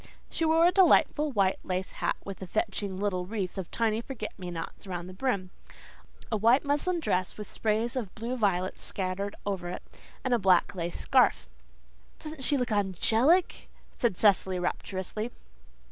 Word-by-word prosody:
She 325 - 0
wore 325 +1 +5
a 350 - +6
delightful 320 -5 +4
white 195 -5 +2
lace 185 0 -2
hat - - -1
with 195 -1 -7
a 190 - -5
fetching 200 -1 -2
little 185 -3 -1
wreath 195 -4 -3
of 185 - -5
tiny 225 -1 0
forget 235 -4 -6
me 180 -1 -5
nots 170 +3 -6
around 175 -2 -4
the 185 - -9
brim, 195 -4 -1 0.8
a 220 - +2
white 230 +6 +4
muslin 315 +5 +1
dress 185 - -1
with 210 -1 -8
sprays 225 +3 0
of 225 -8 -4
blue 235 +3 -3
violets 190 -5 0
scattered 195 +1 -2
over 190 -3 -2
it, - - -6 0.4
and 255 - +1
a 240 - +3
black 185 -3 +4
lace 175 -2 -4
scarf. - - +3 0.7
"Doesn't 305 -3 -7
she 285 +3 +2
look 250 -3 -1
angelic?" 220 - +2 0.3
said 230 -7 0
Cecily 190 -3 +3
rapturously. 190 +4 -3
205 Hz, 165 wpm, -29 LUFS, 185-245 Hz, 0.8 s, a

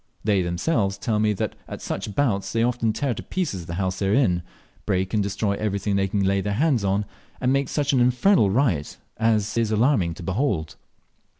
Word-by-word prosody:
They 100 -3 +2
themselves 95 - 0
tell 105 +1 -1
me 105 0 +2
that 95 - -3
at - - -7
such 105 - -5
bouts 110 -9 0
they 115 0 +1
often 120 -2 +1
tear 135 +3 -1
to - - -6
pieces 100 - -3
the 85 - -4
house 95 0 -2
they 100 - 0
are 100 - +2
in, 90 -11 +2 0.5
break 95 -1 0
and 105 - +2
destroy 100 +1 -1
everything 100 -1 -1
they 95 0 +2
can 100 +1 0
lay 95 0 +2
their 105 +1 -2
hands 130 -1 +2
on, 100 +1 +1 0.3
and 130 +1 +1
make 140 -1 0
such 145 -1 0
an 130 - +3
infernal 125 - +4
riot 95 - 0 0.2
as 110 -2 +1
is 115 -2 +1
alarming 110 - +2
to 90 - -9
behold. 95 - -1
105 Hz, 205 wpm, -24 LUFS, 95-125 Hz, 0.5 s, infernal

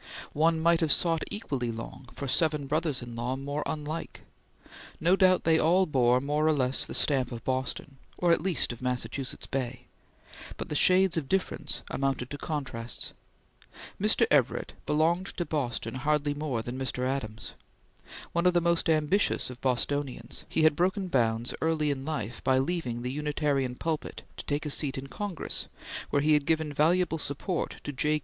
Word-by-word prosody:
One 160 +2 +3
might 170 +1 +4
have 160 -4 +2
sought 165 0 +3
equally 135 - -2
long 120 +3 -8
for 140 - -5
seven 150 +1 +1
brothers 150 -2 0
in 120 -1 -8
law 120 +2 -2
more 140 +2 -3
unlike. 155 +1 -4 0.8
No 175 +4 +4
doubt 185 -1 +4
they 160 0 +4
all 180 +4 +4
bore 125 -5 +3
more 150 +3 +1
or 160 - +5
less 130 -2 0
the - - -5
stamp 130 -4 +2
of 115 -2 -6
Boston, 130 +1 -2 0.2
or 175 -1 +3
at 170 - +4
least 180 -9 +1
of 120 - -12
Massachusetts 125 +1 -2
Bay, 125 -2 -3 0.7
but - - -5
the 150 - -2
shades 185 +2 +5
of 145 -5 -2
difference 185 -5 -1
amounted 135 -2 -1
to 145 - -5
contrasts. 130 -7 -4 0.9
Mr. - - +4
Everett - - +2
belonged 170 +5 +1
to 175 - -1
Boston 135 -7 -2
hardly 145 +2 +1
more 145 -6 -2
than 125 +3 -5
Mr. 125 -1 -2
Adams. 110 -5 -4 0.8
One 170 +1 +2
of 180 - +3
the - - +6
most 170 -1 +1
ambitious 155 0 +2
of 125 - -11
Bostonians, 135 +2 -1
he 160 - +1
had 155 -2 +5
broken 185 +2 0
bounds 115 -4 +1
early 160 -2 +1
in 135 -1 -4
life 120 -7 -4
by 130 0 +3
leaving 130 -5 -1
the 125 - -2
Unitarian 145 -3 0
pulpit 160 +2 -3
to - - -6
take 145 +2 -1
a 150 - -1
seat 140 -1 0
in 135 - -5
Congress 190 +4 -4 0.4
where 145 - +2
he 155 +1 +4
had 150 -2 +2
given 160 -2 +1
valuable 165 +3 +2
support 150 +5 -3
to 145 - -3
J. 150 +3 +2
145 Hz, 175 wpm, -29 LUFS, 130-160 Hz, 0.9 s, the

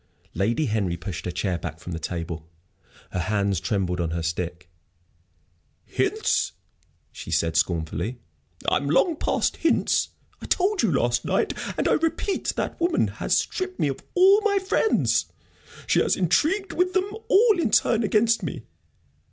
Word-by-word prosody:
Lady 115 - 0
Henry 100 -7 -1
pushed 85 -2 -6
her 90 - -2
chair 90 0 -2
back 80 -2 -6
from 90 - -8
the 80 - -4
table. 85 -2 -5 0.6
Her 90 - -2
hands 100 0 0
trembled 95 -1 -1
on 85 - -1
her 85 0 -3
stick. 85 +1 -3 1.2
"Hints!" - - 0 0.6
she - - -9
said, 80 -1 0
scornfully. 85 +6 -1 0.5
"I'm 140 - +1
long 315 - +3
past - - 0
hints. 330 - +2 0.3
I - - -7
told 390 +2 +2
you 220 - +2
last 120 -4 +1
night - - 0 0.2
and - - +1
I - - +3
repeat 330 +5 0
that - - -3
woman 340 0 +2
has - - +2
stripped 370 -1 -3
me 145 - +2
of 135 - -4 0.2
all 385 +3 +6
my 415 -1 +2
friends! 390 +3 +1 0.6
She - - +3
has - - +2
intrigued 310 - +1
with 365 +1 +1
them 375 0 +2 0.2
all 425 -1 +5
in 320 - +1
turn 230 +1 +3
against 220 +2 +2
me. - - -5
120 Hz, 155 wpm, -25 LUFS, -, 1.2 s, all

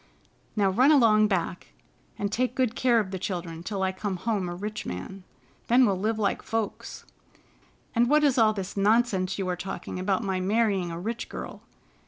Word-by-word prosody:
Now, 200 -3 +2
run 255 +9 +5
along 220 -7 +5
back, 185 -2 -3 0.4
and 205 0 -2
take 250 +2 0
good 255 -3 0
care 240 -2 +3
of 195 -3 -3
the 190 - -4
children 175 -3 -4
till 195 +1 -3
I 190 - +1
come 190 +1 -4
home 200 -3 -1
a 175 - -5
rich 210 +4 -5
man. 95 - -7 0.4
Then 250 +2 +5
we'll 200 -4 +2
live 215 +3 0
like 205 -2 0
folks. 225 -2 -4 0.9
And 235 0 +3
what 300 +1 +4
is 275 -4 +3
all 220 -1 +5
this 195 -3 -5
nonsense 200 -2 +2
you 195 -2 -2
are 180 - -1
talking 180 0 -6
about 195 +3 0
my 190 -2 -1
marrying 200 -2 +1
a 165 0 -5
rich 225 +6 -4
girl? - - -7
205 Hz, 190 wpm, -27 LUFS, 185-230 Hz, 0.9 s, run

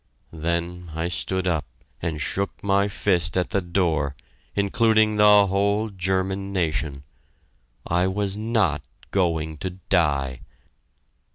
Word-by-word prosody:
Then 85 +2 -3
I 85 +2 -1
stood 90 +2 -1
up 80 -5 0 0.4
and 80 -3 -2
shook 100 +6 -3
my 100 0 +3
fist 95 -4 +1
at 90 - 0
the 100 - +1
door, 85 -6 0 0.4
including 110 +1 +3
the 105 -1 +7
whole 100 +3 +1
German 95 +1 -1
nation! 80 -6 -1 0.8
I 90 +2 +1
was 100 +1 -1
not 105 - +1 0.3
going 80 -4 0
to 95 - -3
die! 75 -8 0
95 Hz, 115 wpm, -24 LUFS, 80-100 Hz, 0.8 s, the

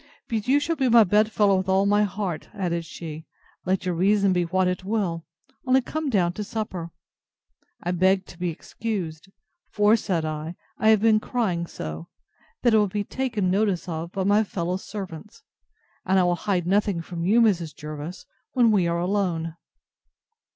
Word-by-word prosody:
But 220 -2 -2
you 275 +3 +4
shall 330 +3 -1
be 265 -4 +1
my 230 -1 +8
bed 210 +3 +3
fellow 200 -3 +3
with 185 0 -2
all 190 +1 +3
my 205 +1 +3
heart, 195 -4 -3
added 170 -4 -2
she, 160 -1 -8 0.4
let 190 0 0
your 180 - 0
reason 195 +2 +3
be 175 -1 +1
what 185 +2 +1
it 180 +1 -2
will; 185 -5 -2 0.4
only 255 +1 +5
come 305 +3 -3
down 180 -7 +2
to 210 - -4
supper. 195 -6 -4 0.9
I 175 - -1
begged 190 +2 +2
to 175 - -13
be 180 0 -1
excused; 180 -1 -5 0.4
for, 210 +1 +4
said 175 -7 -1
I, 155 +2 -4 0.2
I 220 - +4
have 220 -2 +5
been 220 -1 +5
crying 195 -8 -1
so, 80 - -7 0.6
that 240 -2 +4
it - - +6
will 210 - +3
be 205 +2 -2
taken 220 -6 -1
notice 195 -2 +1
of 165 0 -4
by 190 - -2
my 205 +3 +4
fellow 180 -3 -2
servants; 195 0 -8 0.6
and 190 +1 +2
I 185 - +5
will 175 0 +2
hide 180 -1 -1
nothing 195 -2 +1
from 170 0 -5
you, 210 +7 +4
Mrs. 175 -9 +2
Jervis, 155 +4 -7 0.3
when 240 -3 +4
we 190 -5 +3
are 170 0 0
alone. 175 -3 -1
190 Hz, 180 wpm, -25 LUFS, 170-210 Hz, 0.9 s, my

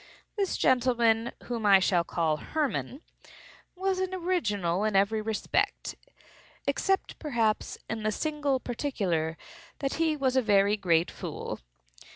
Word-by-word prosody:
This 400 -3 0
gentleman, 235 -3 +3
whom 235 -2 -4
I 200 -2 +7
shall 185 -2 +2
call 165 -2 0
Hermann, 295 - -2 0.7
was 380 0 0
an 375 0 -1
original 210 - 0
in 215 -2 0
every 205 +3 +3
respect—except, 225 - -3
perhaps, 230 -8 0
in 220 0 -3
the 215 0 0
single 290 0 0
particular 190 - -2 0.4
that 275 -1 -2
he 315 -2 +2
was 265 -2 +1
a 260 - +5
very 205 -2 +4
great 170 -4 +2
fool. - - -6
225 Hz, 125 wpm, -28 LUFS, 200-290 Hz, 0.7 s, I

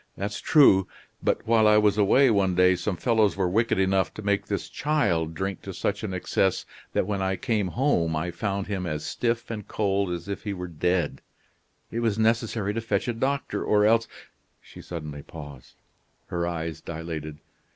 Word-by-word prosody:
That's 100 +1 -3
true. 115 - +5 0.3
But - - 0
while 110 -1 +4
I 105 0 +6
was 105 -1 +4
away 115 +6 +4
one 95 -3 +2
day 90 +1 +5
some 90 +1 -3
fellows 110 -4 +2
were 95 -2 +1
wicked 115 +6 +1
enough 95 -1 +2
to 110 - -7
make 100 0 0
this 100 - -3
child 85 - 0
drink 95 +3 -3
to 95 -2 -7
such 100 0 -1
an 105 - -3
excess 95 +1 0 0.3
that - - +1
when 100 -1 -2
I 95 0 0
came 110 -4 -1
home 90 - +1
I 85 +3 -2
found 100 0 -2
him 95 -3 -3
as 75 -2 -3
stiff 115 -1 -2
and 105 -3 -6
cold 100 -2 0
as 85 0 -4
if 100 - -4
he 105 -2 -3
were 90 -1 -5
dead. 85 -3 -1 0.7
It 115 - -2
was 115 -3 0
necessary 110 -2 +1
to 115 - -2
fetch 105 -2 -1
a 120 - 0
doctor 135 +4 -1
or 105 -1 +3
else 115 +1 +3 0.3
" - - -43
She - - -13
suddenly 75 -4 -7
paused; 70 -4 -11 0.5
her 85 -1 -1
eyes 85 -2 -4
dilated. 80 -2 -6
100 Hz, 190 wpm, -26 LUFS, 90-110 Hz, 0.7 s, I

